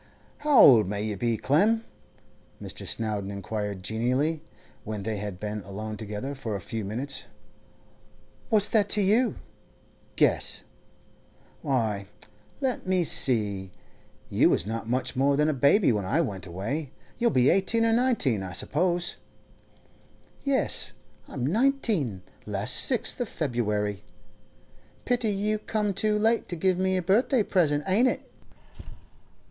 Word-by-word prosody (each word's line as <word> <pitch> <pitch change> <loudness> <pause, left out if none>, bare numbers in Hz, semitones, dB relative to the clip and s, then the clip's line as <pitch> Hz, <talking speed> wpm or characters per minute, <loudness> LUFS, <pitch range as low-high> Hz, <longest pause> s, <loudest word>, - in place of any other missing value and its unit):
'How 295 -2 +2
old 115 -7 +8
may 100 0 -3
you 105 -1 -3
be, 115 +2 -1
Clem?' 215 - +2 0.7
Mr. - - -7
Snowdon 105 -3 -2
inquired 100 -1 -5
genially, 130 - 0 0.4
when 105 -2 -5
they 110 0 -3
had 100 -3 -6
been 105 0 -4
alone 105 +2 -6
together 105 +6 -5
for 115 -6 -5
a - - -3
few 110 +4 -5
minutes. 130 +7 -3 1.2
'What's 210 -4 +4
that 205 -3 +2
to - - +3
you? 225 +6 +2 0.8
Guess.' - - +2 1.0
'Why, 110 -9 -1 0.5
let 260 -7 -2
me 185 -1 +2
see; 105 - +1 0.6
you - - +3
was 85 - +1
not 110 +1 -5
much 130 +2 -1
more 140 +2 +2
than 150 +1 +3
a 155 - +1
baby 140 - +4
when 105 -4 -1
I 135 - +1
went 100 - -3
away. 115 - -4 0.3
You'll 235 - +3
be 130 - +3
eighteen 225 +4 +2
or 225 - +2
nineteen, 225 - +1
I 95 -1 -6
suppose.' 175 - 0 1.3
'Yes, 275 -1 0 0.3
I'm 125 -4 -4
nineteen—last 140 - 0
sixth 245 - +3
of 240 - -2
February. 105 - -2 1.0
Pity 245 -2 0
you 210 +1 -1
come 210 -1 -1
too 210 +2 +1
late 225 +2 +1
to 175 - -3
give 185 +2 +1
me 190 0 +1
a 180 - -2
birthday 225 +6 +2
present, 150 -7 +1
ain't 200 +7 +3
it? - - -3
140 Hz, 135 wpm, -26 LUFS, -, 1.3 s, old